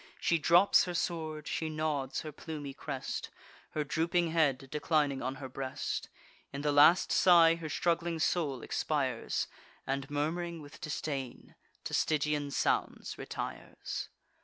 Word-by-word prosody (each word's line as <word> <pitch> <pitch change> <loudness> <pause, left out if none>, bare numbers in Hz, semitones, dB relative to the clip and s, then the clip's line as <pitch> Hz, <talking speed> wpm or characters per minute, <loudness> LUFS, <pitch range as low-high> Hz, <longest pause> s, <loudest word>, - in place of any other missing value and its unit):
She 170 - +2
drops 175 +6 +5
her 180 -1 -4
sword; 155 -3 -2
she 160 - -2
nods 155 -4 -1
her 155 - -6
plumy 145 -2 -7
crest, 135 -1 -5 0.5
Her 155 - +1
drooping 165 +3 +1
head 145 -5 +2
declining 150 -3 +1
on 130 +2 -2
her 135 0 -7
breast: 130 0 -4 0.4
In 140 - -5
the 150 - +2
last 145 +5 +6
sigh 170 -3 +7
her 165 -2 -5
struggling 170 +1 0
soul 155 -5 0
expires, 135 -6 -1 0.4
And, 135 0 -2
murm'ring 165 +4 -2
with 145 -1 -12
disdain, 140 -4 -4 0.3
to - - -5
Stygian 150 -1 +1
sounds - - -1
retires. - - -5
150 Hz, 135 wpm, -32 LUFS, 140-165 Hz, 0.5 s, sigh